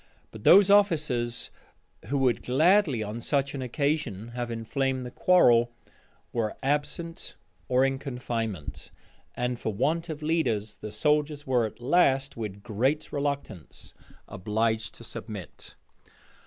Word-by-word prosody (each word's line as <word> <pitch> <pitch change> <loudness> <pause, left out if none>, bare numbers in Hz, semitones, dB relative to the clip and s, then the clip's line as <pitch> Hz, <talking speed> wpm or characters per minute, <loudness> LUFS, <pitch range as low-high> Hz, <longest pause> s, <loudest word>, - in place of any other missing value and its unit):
But 110 - -11
those 200 +1 +7
officers 150 - +2 0.5
who 140 +8 -1
would 130 -3 +2
gladly 155 - +3
on 105 +3 -5
such 140 +2 0
an 140 - -4
occasion 130 -5 -2
have 120 0 -4
inflamed 130 +3 -2
the 125 - -7
quarrel, 120 -9 +4 0.6
were 115 -3 -1
absent 150 +4 -2 0.3
or 130 +1 +3
in 135 0 -1
confinement; 115 - -4 0.5
and 125 0 -2
for 110 - -2
want 160 - 0
of 155 -1 -5
leaders, 120 -10 0
the 105 - -7
soldiers 150 +1 +1
were 125 -4 +2
at 110 - -13
last, 135 0 +2
with 105 -3 -6
great 130 +8 -1
reluctance, 140 - -4 0.3
obliged 110 +3 -1
to - - -12
submit. 100 -3 -8
125 Hz, 130 wpm, -27 LUFS, 115-150 Hz, 0.6 s, those